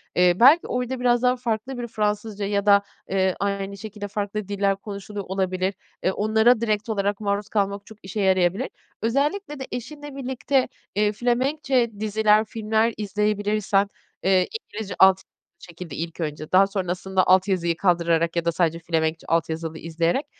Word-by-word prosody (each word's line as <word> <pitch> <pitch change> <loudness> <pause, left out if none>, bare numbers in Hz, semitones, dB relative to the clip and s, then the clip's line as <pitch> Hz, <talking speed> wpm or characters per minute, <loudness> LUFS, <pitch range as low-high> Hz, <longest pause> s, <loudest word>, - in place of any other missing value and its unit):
Eee, 180 0 +5
belki 280 +8 +7
orada 250 +1 -2
biraz 245 -1 +3
daha 250 0 +3
farklı 245 +1 -3
bir 240 -1 -4
Fransızca 210 -1 -2
ya 200 0 0
da, 200 -1 +6 0.3
eee, 190 -1 +1
aynı 200 0 -2
şekilde 205 0 -7
farklı 205 0 -3
diller 200 -1 +1
konuşuluyor 200 0 -7
olabilir. 185 0 -1 0.3
Eee, 185 - +2
onlara 220 +3 +3
direkt 215 0 -1
olarak 200 -1 0
maruz 205 0 -2
kalmak 200 -1 -1
çok 220 - -14
işe 195 +2 -4
yarayabilir. 190 +5 +2 0.3
Özellikle 295 - -1
de 265 - -6
eşinle 290 +4 -7
birlikte, 265 0 0 0.3
eee, 210 0 +2
Felemenkçe 250 +2 +1
diziler, 215 0 +3
filmler 220 +1 0
izleyebilirsen, 205 0 0 0.4
eee, 185 -1 +3
İngilizce 205 -3 -7
alt 190 0 +6 0.4
şekilde 170 -3 -9
ilk 165 +1 -5
önce, 155 -1 -4
daha 195 +1 +6
sonrasında 190 -1 -1
alt 185 +2 +5
yazıyı 170 -3 0
kaldırarak 170 -2 +2
ya 170 0 0
da 170 - +2
sadece 165 -1 0
Felemenkçe 160 -1 -1
alt 165 -1 +1
yazılı 160 0 -4
izleyerek; 165 - -1
205 Hz, 155 wpm, -24 LUFS, 185-225 Hz, 0.4 s, belki